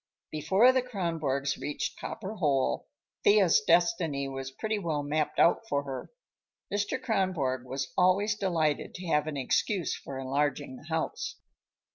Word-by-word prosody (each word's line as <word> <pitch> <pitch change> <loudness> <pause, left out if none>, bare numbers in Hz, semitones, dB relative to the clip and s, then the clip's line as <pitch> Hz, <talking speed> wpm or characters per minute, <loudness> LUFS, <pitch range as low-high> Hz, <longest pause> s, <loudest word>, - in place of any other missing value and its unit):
Before 190 - +4
the 260 0 +2
Kronborgs 165 - -2
reached 150 - -3
Copper 210 -1 -5
Hole, 140 - +1 0.4
Thea's 200 -5 +5
destiny 165 -4 +2
was 135 0 -5
pretty 215 +10 -2
well 155 -6 -1
mapped 150 +1 -1
out 200 +6 +4
for 140 0 +1
her. 135 -2 -6 0.6
Mr. 205 +6 0
Kronborg 185 - 0
was 135 +1 -4
always 190 +4 +3
delighted 165 -8 0
to 180 - -7
have 150 -2 +1
an 150 -2 -3
excuse 170 - 0
for 135 - -8
enlarging 140 +1 -1
the 145 - -14
house. 160 -1 -2
155 Hz, 140 wpm, -29 LUFS, 140-190 Hz, 0.6 s, Thea's